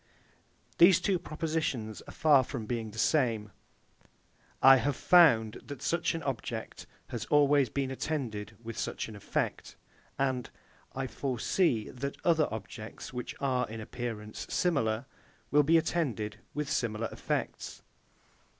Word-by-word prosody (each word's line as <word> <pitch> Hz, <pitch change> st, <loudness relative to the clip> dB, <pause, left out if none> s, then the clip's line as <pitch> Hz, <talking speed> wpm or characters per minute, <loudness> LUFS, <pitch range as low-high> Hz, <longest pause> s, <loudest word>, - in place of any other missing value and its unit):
These 175 Hz, +1 st, +8 dB
two 185 Hz, 0 st, +1 dB
propositions 155 Hz, -, -3 dB
are -, -, -8 dB
far 145 Hz, -4 st, +5 dB
from 125 Hz, -3 st, -5 dB
being 115 Hz, -1 st, -3 dB
the 105 Hz, -, -12 dB
same, 115 Hz, -5 st, +1 dB, 1.1 s
I 135 Hz, 0 st, +8 dB
have 135 Hz, +3 st, 0 dB
found 120 Hz, -13 st, +5 dB
that 140 Hz, -3 st, -8 dB
such 170 Hz, 0 st, 0 dB
an 165 Hz, -, -4 dB
object 135 Hz, -5 st, -5 dB, 0.2 s
has -, -, -4 dB
always 145 Hz, -3 st, +4 dB
been 135 Hz, +2 st, -2 dB
attended 115 Hz, -8 st, -4 dB
with 115 Hz, -1 st, -6 dB
such -, -, -3 dB
an 110 Hz, -, -9 dB
effect, 100 Hz, -, -3 dB, 0.4 s
and 130 Hz, -2 st, 0 dB, 0.5 s
I 135 Hz, 0 st, -2 dB
foresee, 130 Hz, -, 0 dB
that 140 Hz, +2 st, -5 dB
other 160 Hz, -3 st, +3 dB
objects, 110 Hz, +2 st, -7 dB
which 125 Hz, -1 st, -5 dB
are, 130 Hz, -4 st, 0 dB
in 110 Hz, +1 st, -6 dB
appearance, 110 Hz, -2 st, -6 dB
similar, 125 Hz, -9 st, +1 dB, 0.5 s
will 150 Hz, -, +6 dB
be 160 Hz, +3 st, +4 dB
attended 140 Hz, -10 st, -1 dB, 0.2 s
with 150 Hz, -1 st, -2 dB
similar 115 Hz, -3 st, -1 dB
effects. -, -, -4 dB
130 Hz, 130 wpm, -30 LUFS, 110-150 Hz, 1.1 s, These